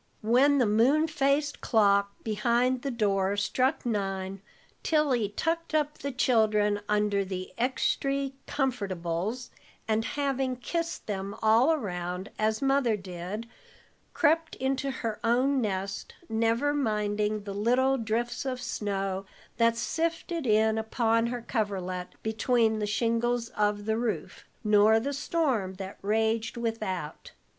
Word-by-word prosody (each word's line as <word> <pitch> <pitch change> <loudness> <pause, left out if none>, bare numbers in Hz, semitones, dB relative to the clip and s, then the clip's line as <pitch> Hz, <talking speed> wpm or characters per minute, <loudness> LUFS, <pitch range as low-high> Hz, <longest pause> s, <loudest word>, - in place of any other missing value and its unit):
When 260 +6 +4
the 255 - +4
moon 250 +9 +3
faced 290 -1 0
clock 200 -3 +3
behind 235 +4 +1
the 275 - -2
door 200 -4 +1
struck 255 +8 0
nine, 195 -3 -2 0.4
Tilly 275 -9 +2
tucked 330 0 -1
up 300 -1 0
the 280 - -3
children 215 -5 +2
under 210 -1 +2
the 185 -1 -6
"extry 275 +2 0
comfortables," 205 - -2 0.4
and 220 0 +1
having 270 -1 -1
kissed 335 +7 -3
them 200 -1 -4
all 225 +7 +5
around, 180 - -3
as 220 +3 +1
Mother 270 -5 +2
did, 190 +4 -6 0.7
crept 320 +2 +2
into 270 +1 -1
her 230 -5 -3
own 255 +4 +2
nest, 195 -2 -3
never 230 +5 +1
minding 210 -5 0
the 200 -1 -5
little 255 +6 +2
drifts 230 +2 -2
of 260 -2 -3
snow 195 -4 -3 0.3
that 230 0 +3
sifted 330 +3 -2
in 220 0 +3
upon 230 +1 +1
her 240 -1 -4
coverlet 185 -6 -2 0.2
between 220 0 +1
the 210 - -1
shingles 230 +2 0
of 205 -1 0
the 220 0 0
roof, 235 -2 -3 0.2
nor 210 +1 +5
the 280 +5 -3
storm 270 - 0
that 190 0 -8
raged 220 +3 0
without. 215 -9 -4
225 Hz, 125 wpm, -28 LUFS, 205-260 Hz, 0.7 s, all